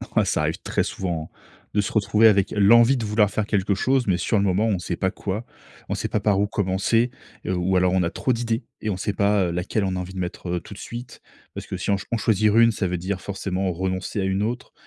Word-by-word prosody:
Ouais, - - +4
ça - - 0
arrive - - -1
très - - 0
souvent 85 -4 -4
hein, - - -31 0.4
de 105 - +3
se 100 - -4
retrouver 105 +1 +4
avec 100 -3 +3
l'envie 115 +6 +5
de 115 - -3
vouloir 105 -1 +2
faire 110 - -1
quelque 100 0 +1
chose, 130 +5 +1
mais 90 -2 +2
sur 105 +4 0
le 100 - +2
moment, 100 +3 +2
on 100 -4 +1
sait 90 -1 -3
pas 95 - 0
quoi. 105 +4 -4 0.4
On - - -1
sait - - -2
pas 105 - 0
par 100 -2 +2
où 100 - +3
commencer? 105 +5 +1 0.4
Et, - - -1
ou 95 +1 0
alors 90 0 +3
on 95 -2 +2
a 85 - 0
trop 130 +6 -1
d'idées. 115 0 -2 0.2
Et 110 - -2
on 95 - -1
sait 100 +2 -2
pas, 100 -1 +2
heu, 85 - -1
laquelle 90 +4 -1
on 95 -1 -1
a - - -2
envie 90 +1 -6
de 95 - -6
mettre, 90 0 -5
heu, - - -2
tout 95 - -11
de 95 - -11
suite. 120 +1 -8 0.3
Parce - - -6
que - - -4
si - - -4
on 100 - +4 0.2
en 115 - +1
choisir 110 0 +2
une, 115 0 +6
ça 105 - -2
veut 90 0 -2
dire 95 +2 -3
forcément 95 -1 -2
renoncer 95 +3 -3
à - - 0
une 95 +2 0
autre. 120 +3 -4
100 Hz, 270 wpm, -23 LUFS, 95-110 Hz, 0.4 s, une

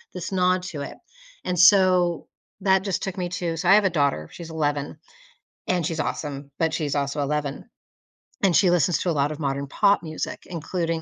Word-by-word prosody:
this 180 +2 -5
nod 185 -1 +2
to 160 -6 -6
it. 140 - -7 0.5
And 180 -1 -2
so 185 -2 +5 0.3
that 190 -1 +3
just 195 -3 -2
took 195 0 -4
me 180 -1 -2
to 175 -2 -3
so, 180 +2 0
I 195 - +8
have 210 - +4
a - - +4
daughter, 140 - 0
she's 170 -2 -9
11, 145 -2 -2 0.7
and 180 -2 +1
she's 160 -1 -3
awesome, 140 -2 -4
but 160 -1 +2
she's 145 -3 -1
also 140 +1 -1
11, 145 0 -2 0.8
and 185 -3 +4
she 185 +2 +5
listens 175 -2 +2
to 180 - -1
a - - +2
lot 145 -1 +1
of 155 - -7
modern 140 -1 -2
pop 200 +4 +2
music, 155 -1 -5
including 165 -1 -3
165 Hz, 195 wpm, -24 LUFS, 145-185 Hz, 0.8 s, I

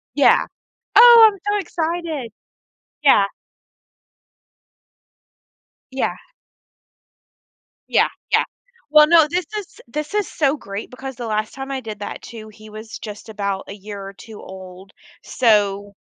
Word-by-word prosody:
Yeah. - - +5 0.5
Oh, 470 -2 +9
I'm 395 - -13
so 415 - +1
excited. 330 - -3 0.7
Yeah. 210 -8 +6 2.7
Yeah. 265 - -1 1.7
Yeah, - - +3 0.2
yeah. - - +4 0.5
Well, 300 0 +7
no. 330 -2 +6
This 355 +1 -2
is 405 - -10
this 300 - -5
is 415 -2 0
so 290 -1 0
great 200 -5 -7
because 265 0 -8
the 240 - -6
last 215 -1 -2
time 270 0 -7
I 270 - -3
did 215 -4 -8
that 205 - -6
too, 220 -2 -10
he 215 +1 -15
was, 220 +1 -9
just, 210 0 -9
about 200 -2 -3
a - - -6
year 205 0 -9
or 195 - -8
2 215 +2 -13
old, 190 0 -12 0.3
so, 205 -4 +1
230 Hz, 130 wpm, -20 LUFS, 205-305 Hz, 2.7 s, Oh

